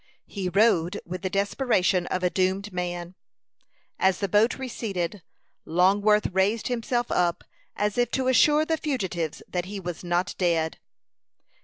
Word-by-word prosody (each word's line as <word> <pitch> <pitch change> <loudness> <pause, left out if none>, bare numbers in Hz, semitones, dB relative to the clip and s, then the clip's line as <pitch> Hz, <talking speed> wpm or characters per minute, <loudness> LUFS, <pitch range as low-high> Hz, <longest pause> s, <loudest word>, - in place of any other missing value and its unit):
He 190 -3 -4
rowed 195 -1 +2
with 180 +1 -6
the 190 - -2
desperation 195 -2 +1
of 185 - -2
a 180 - +2
doomed 190 +2 0
man. 175 0 -4 0.9
As 190 -1 +3
the 200 - -1
boat 210 +5 +3
receded, 205 -8 -4 0.4
Longworth 200 +5 +3
raised 200 +6 +1
himself 240 0 -1
up, 175 -1 +1 0.3
as 210 +2 -1
if 245 - +2
to 260 -1 -1
assure 295 +4 +4
the 320 0 0
fugitives 190 - -3
that 180 -1 -3
he 200 +1 -6
was 175 -2 -6
not 175 +2 0
dead. 165 -3 0
190 Hz, 145 wpm, -26 LUFS, 180-220 Hz, 0.9 s, assure